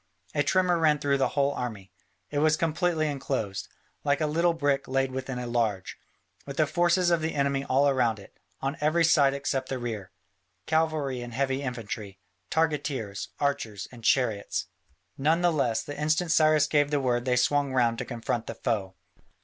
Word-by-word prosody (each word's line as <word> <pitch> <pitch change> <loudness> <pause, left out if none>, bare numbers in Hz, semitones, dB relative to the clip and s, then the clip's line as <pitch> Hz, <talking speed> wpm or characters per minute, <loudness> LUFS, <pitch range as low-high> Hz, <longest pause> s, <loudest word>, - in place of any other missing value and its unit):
A 145 - +2
tremor 180 +3 +2
ran 155 -2 +4
through 140 -1 0
the - - +3
whole 140 0 +3
army; 110 -8 -5 0.4
it 145 - 0
was 155 +1 +3
completely 165 0 0
enclosed, 130 -9 -3 0.4
like 145 0 +2
a 155 - +1
little 165 +3 +2
brick 145 -3 0
laid 135 0 0
within 130 0 -4
a 125 - -4
large, 115 -6 -1 0.5
with 140 +1 -7
the 155 - +4
forces 175 +3 +2
of 170 -2 +2
the 160 +1 -2
enemy 140 -1 0
all 140 +1 +3
round 120 -4 +1
it, 100 - -14 0.3
on 135 +3 -2
every 155 +3 +3
side 140 -4 +4
except 135 -1 -2
the 130 - -2
rear, 110 -6 -5 0.6
cavalry 155 -5 0
and 120 -1 -7
heavy 135 0 0
infantry, 110 -6 -5 0.3
targeteers, 145 -10 -1
archers, 140 -8 -2
and 120 -2 -13
chariots. 110 -5 +1 0.5
None 160 +5 +2
the 175 -1 +4
less, 120 -7 0
the 145 - -7
instant 160 +3 +1
Cyrus 155 -2 +5
gave 145 -1 +2
the 145 -1 +1
word 120 -2 0
they 125 -1 +2
swung 140 +3 +2
round 120 -3 +2
to - - -2
confront 120 -1 -3
the - - -5
foe. 100 -6 -2
140 Hz, 180 wpm, -27 LUFS, 120-155 Hz, 0.6 s, Cyrus